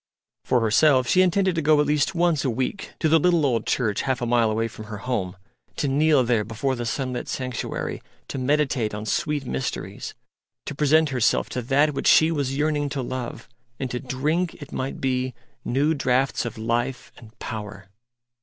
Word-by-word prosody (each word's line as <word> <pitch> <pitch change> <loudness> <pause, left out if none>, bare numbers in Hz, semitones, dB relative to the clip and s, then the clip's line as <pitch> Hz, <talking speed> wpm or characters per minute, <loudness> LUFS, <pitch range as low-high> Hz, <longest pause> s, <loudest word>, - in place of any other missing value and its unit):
For 125 - +2
herself 130 +4 +4
she 185 - +4
intended 185 +1 +2
to 165 - -1
go 150 0 +4
at 150 - +3
least 150 +5 +1
once 170 -3 +2
a 135 - +1
week 130 - -3
to 160 - +3
the 160 +1 +5
little 170 -2 +3
old 120 -4 0
church 110 -5 0
half 130 -2 -1
a 120 - -2
mile 120 -1 +3
away 110 +1 0
from 110 -1 -10
her 105 -1 -7
home, 95 -7 -2 0.4
to 145 - -1
kneel 145 0 +3
there 120 -3 +1
before 115 +5 -2
the 120 -1 -4
sunlit 125 +1 -3
sanctuary, 130 -3 -4 0.3
to 135 - -5
meditate 130 -5 0
on 105 +1 -5
sweet 145 +5 -1
mysteries, 125 0 -4 0.5
to - - -4
present 150 +2 +3
herself 125 -3 +1
to 125 - -3
That 140 +5 +2
which 135 - -2
she 160 +1 +6
was 140 -4 -1
yearning 145 -1 0
to 135 -2 -3
love, 125 -2 -5 0.3
and 130 -2 -3
to 125 - -2
drink, 150 +7 -1
it 145 - -10
might 130 +1 -4
be, 130 -1 -1 0.3
new 145 +5 +1
draughts 135 -2 +1
of 120 - -5
life 120 +3 -2
and 115 -2 -16
power. 105 -3 -7
130 Hz, 190 wpm, -24 LUFS, 120-150 Hz, 0.5 s, she